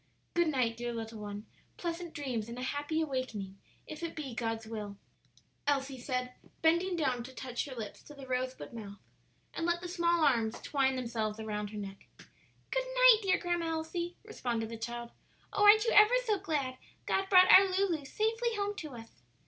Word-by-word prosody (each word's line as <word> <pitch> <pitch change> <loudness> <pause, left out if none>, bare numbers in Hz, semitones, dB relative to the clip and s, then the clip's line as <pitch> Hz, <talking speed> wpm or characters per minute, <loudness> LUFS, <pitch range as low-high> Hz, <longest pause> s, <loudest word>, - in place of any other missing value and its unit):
"Good 345 -1 +3
night, 250 -6 +1
dear 240 0 -3
little 225 -1 -6
one; 205 0 -6 0.3
pleasant 340 0 -4
dreams 250 -7 -3
and 235 - -7
a 250 - -4
happy 290 +4 -1
awaking, 230 -10 -3 0.3
if 310 - -8
it 335 -1 -4
be 280 -5 -5
God's 225 -1 -2
will," 210 -2 -6 0.7
Elsie 270 -2 0
said, 250 0 -2 0.3
bending 345 +3 +3
down 260 -7 0
to 255 - -9
touch 250 -1 -4
her 270 -3 -8
lips 220 -4 -7
to 295 - -12
the 275 -1 -10
rosebud 255 0 -3
mouth 205 -3 -8 0.6
and 330 - -2
let 345 0 +1
the 355 - -6
small 340 -2 +2
arms 230 -5 +2
twine 270 -2 +1
themselves 225 -4 -2
around 210 -1 -3
her 210 - -8
neck. 195 -1 -8 0.6
"Good - - 0
night, - - +8
dear 385 -3 +3
Grandma 345 -1 -1
Elsie," 325 +2 -3
responded 240 - -3
the 230 - -5
child. 235 +1 -5 0.4
"Oh, 415 - +3
aren't 430 +2 +8
you 465 - +2
ever 425 +4 +7
so 425 -4 +1
glad 285 -8 -2 0.3
God 385 0 0
brought 370 -1 +8
our 390 +1 +9
Lulu 370 -5 +1
safely 450 - 0
home 410 0 -1
to 300 -5 -6
us?" 230 -1 -13
270 Hz, 185 wpm, -32 LUFS, 230-345 Hz, 0.7 s, our